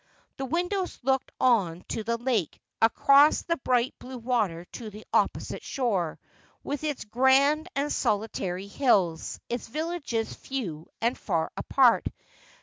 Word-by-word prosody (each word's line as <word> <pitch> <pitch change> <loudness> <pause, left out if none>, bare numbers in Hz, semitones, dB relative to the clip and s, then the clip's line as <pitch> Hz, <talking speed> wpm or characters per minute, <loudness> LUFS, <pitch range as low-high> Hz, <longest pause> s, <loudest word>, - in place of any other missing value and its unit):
The 270 - -3
windows 360 +5 -1
looked 265 +1 +1
on 190 -9 +2
to 225 - -2
the 235 +2 -1
lake, 235 - -1 0.2
across 275 +6 +5
the 335 -1 -1
bright 250 -1 +1
blue 255 0 -8
water 220 -9 -1
to 225 -3 -6
the 210 +1 -12
opposite - - 0
shore, 200 - -1 0.5
with 285 +1 -4
its 295 -6 -3
grand 270 +8 +3
and 285 +2 0
solitary 195 -3 -1
hills, 195 - +1
its 240 -1 -4
villages 305 -5 -3
few 180 - -5
and 235 +3 +1
far 165 -5 -1
apart. 255 -4 +3
245 Hz, 135 wpm, -27 LUFS, 210-275 Hz, 0.5 s, across